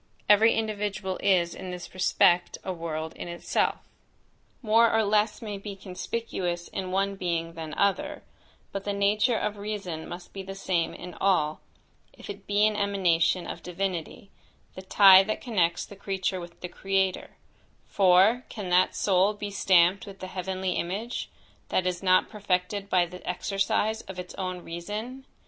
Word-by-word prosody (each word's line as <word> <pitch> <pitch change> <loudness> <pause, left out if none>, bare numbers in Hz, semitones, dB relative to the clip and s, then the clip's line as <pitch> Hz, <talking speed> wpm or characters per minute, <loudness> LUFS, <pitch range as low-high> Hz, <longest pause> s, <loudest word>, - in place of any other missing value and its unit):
Every 215 +2 +6
individual 205 -3 -2
is 175 -3 +2
in 185 - -7
this 180 -1 -7
respect 180 -1 +3
a 185 - -3
world 160 -2 -4
in - - -7
itself. 170 0 -1 0.8
More 230 +1 +5
or 225 0 +3
less 210 +2 +1
may 205 -2 -5
be 200 0 -7
conspicuous 185 -2 -4
in 190 -1 -4
one 195 +1 0
being 170 -3 -2
than 160 -2 -7
other; 200 -1 0 0.5
but 195 - -4
the 205 - -2
nature 210 +4 +2
of 210 0 -2
reason 200 -6 -5
must 175 0 -9
be 195 - -5
the 195 0 -8
same 180 -4 -1
in 180 0 -9
all, 155 -6 +2 0.5
if - - -8
it 200 0 -12
be 205 +1 +3
an 215 0 +2
emanation 185 -4 +2
of - - -6
divinity, 180 +1 -4 0.4
the 185 - -8
tie 190 0 +8
that 215 +2 -2
connects 180 -8 0
the 200 - -12
creature 190 -1 -2
with 170 -1 -11
the 180 - -4
Creator; 195 0 -1 0.5
for, 195 +6 +4
can 205 -5 -6
that 180 +1 +3
soul 195 +1 +2
be 205 0 -5
stamped 190 +2 +3
with 195 -1 -9
the - - -6
heavenly 185 0 -3
image, 205 +8 -3 0.4
that 185 - +1
is 180 -1 -1
not 185 -1 +4
perfected 200 -1 -2
by 180 -3 +3
the 180 +1 -11
exercise 195 +4 0
of 190 - -7
its 180 0 -7
own 185 -2 -4
reason? 215 +10 -6
190 Hz, 165 wpm, -27 LUFS, 180-205 Hz, 0.8 s, tie